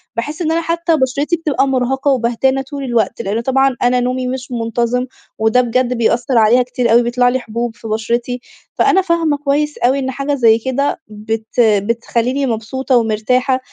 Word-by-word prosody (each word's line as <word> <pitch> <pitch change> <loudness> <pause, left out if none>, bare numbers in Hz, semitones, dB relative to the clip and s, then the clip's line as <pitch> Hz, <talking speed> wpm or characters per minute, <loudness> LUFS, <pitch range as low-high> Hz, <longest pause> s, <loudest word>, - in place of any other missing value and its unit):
باحس 295 +8 -4
إن 320 -2 0
أنا 330 +1 +1
حتى 335 0 0
بشرتي 280 +4 0
بتبقى 300 -4 0
مرهقة 265 +2 0
وبهتانة 260 +2 +1
طول 280 +1 -7
الوقت، 235 -2 -1
لأنه 220 +1 -2
طبعًا 270 +1 +2
أنا 245 0 +3
نومي 255 +1 -1
مش 255 0 -5
منتظم، 235 +1 -1 0.3
وده 220 +3 +3
بجد 250 +1 0
بيأثر 235 +1 +1
عليها 230 +3 +5
كتير 245 -1 -1
أوي، 235 +1 +5
بيطلع 245 +1 +2
لي 260 +1 0
حبوب 235 -1 -4
في 225 - -10
بشرتي. 235 +3 -2 0.3
فأنا 385 - +3
فاهمة 335 -5 0
كويس 295 +1 -1
أوي 260 +3 +2
إن 265 0 -2
حاجة 275 +2 -2
زي 230 -4 +4
كده 265 +7 -2
بت 220 +1 -5
بتخليني 230 +4 +1
مبسوطة 250 +3 -1
ومرتاحة، 240 +4 +1
250 Hz, 170 wpm, -16 LUFS, 230-270 Hz, 0.3 s, عليها